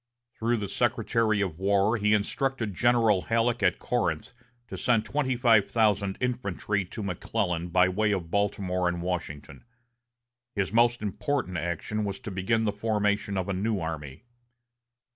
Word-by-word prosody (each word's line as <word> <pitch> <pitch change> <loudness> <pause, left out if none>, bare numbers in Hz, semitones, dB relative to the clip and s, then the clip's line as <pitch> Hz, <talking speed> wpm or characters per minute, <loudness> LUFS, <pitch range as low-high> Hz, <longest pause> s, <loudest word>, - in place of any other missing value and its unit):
Through 120 +1 0
the 105 -2 -3
Secretary 115 -1 +1
of 90 -5 -3
War 100 +3 +2
he 105 -1 +3
instructed 115 +1 -1
General 115 -2 +3
Halleck 115 +3 0
at - - +3
Corinth 100 -8 -2 0.3
to 95 - -7
send 110 +3 +1
twenty 130 -1 0
five 115 -5 +4
thousand 100 -4 +1
infantry 105 -5 -1
to 105 +4 -7
McClellan 90 -2 -2
by 90 +1 +4
way 105 +3 +1
of 90 -5 -2
Baltimore 95 -3 0
and 85 -1 -2
Washington. 75 -6 -5 0.9
His 100 -1 -1
most 120 0 +3
important 105 -1 -2
action 85 +6 -3
was 100 -1 -3
to 115 -5 -6
begin 95 +5 0
the 105 - +1
formation 105 -1 0
of 95 0 -2
a 100 - -1
new 100 +2 -1
army. 80 - -6
105 Hz, 150 wpm, -27 LUFS, 95-115 Hz, 0.9 s, five